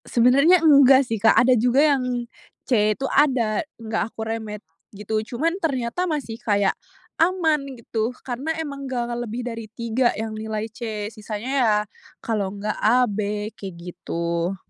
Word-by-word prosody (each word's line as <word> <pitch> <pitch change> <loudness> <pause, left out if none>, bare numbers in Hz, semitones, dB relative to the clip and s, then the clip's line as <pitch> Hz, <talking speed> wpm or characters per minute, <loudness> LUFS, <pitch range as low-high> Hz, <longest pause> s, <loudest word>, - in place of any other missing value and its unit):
Sebenernya 275 +9 +5
enggak 275 -3 +7
sih, 225 -3 -3
Kak, 220 - +5
ada 255 +1 +6
juga 250 +6 +4
yang 250 -2 -2 0.4
C 215 -4 +2
itu 270 - -3
ada, 255 -7 +2 0.2
nggak 220 -1 -3
aku 220 - -9
remed 220 -2 -5 0.3
gitu. 210 +2 -2
Cuman 330 +9 -1
ternyata 280 +4 -1
masih 270 -8 -4
kayak 205 -2 +2 0.5
aman 330 -4 +2 0.2
gitu 225 -1 -2 0.2
karena 255 +4 -4
emang 280 -4 -5
nggak 240 -2 -2 0.2
lebih 240 +3 -4
dari 230 -3 -6
3 235 +2 0
yang 220 0 -4
nilai 215 0 -4
C 220 -3 -5
sisanya 215 +2 -6
ya, 220 -3 +4 0.4
kalo 210 -4 -2
nggak 210 +1 -3
A, 250 +3 +4
B 210 0 -3
kayak 195 -5 -8
gitu. 170 0 -3
230 Hz, 150 wpm, -23 LUFS, 215-265 Hz, 0.5 s, enggak